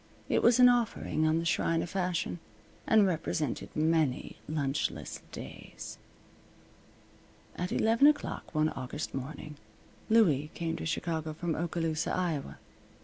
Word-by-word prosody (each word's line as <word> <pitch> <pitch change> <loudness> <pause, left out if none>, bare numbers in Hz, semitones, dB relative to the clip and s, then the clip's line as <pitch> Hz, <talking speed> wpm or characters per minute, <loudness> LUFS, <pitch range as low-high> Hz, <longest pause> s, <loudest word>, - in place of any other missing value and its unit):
It - - +3
was 235 +1 +5
an 250 - +9
offering 230 -10 +1
on 155 +1 +3
the 165 - -1
shrine 165 -1 +1
of 175 - -7
Fashion, 180 -2 -1 0.5
and 215 -2 +6
represented 160 -5 -1
many 155 -4 +1
lunchless 145 -2 -2
days. - - -9 1.6
At 180 +1 -3
eleven 230 +6 +4
o'clock 295 - 0
one 155 0 +3
August 135 +3 -5
morning, 145 +3 -6 0.5
Louie 160 -11 +4
came 165 -1 -2
to - - -4
Chicago 160 -1 -2
from 165 +1 -2
Oskaloosa, 165 -1 -1
Iowa. 165 -6 -2
165 Hz, 125 wpm, -30 LUFS, 155-185 Hz, 1.6 s, an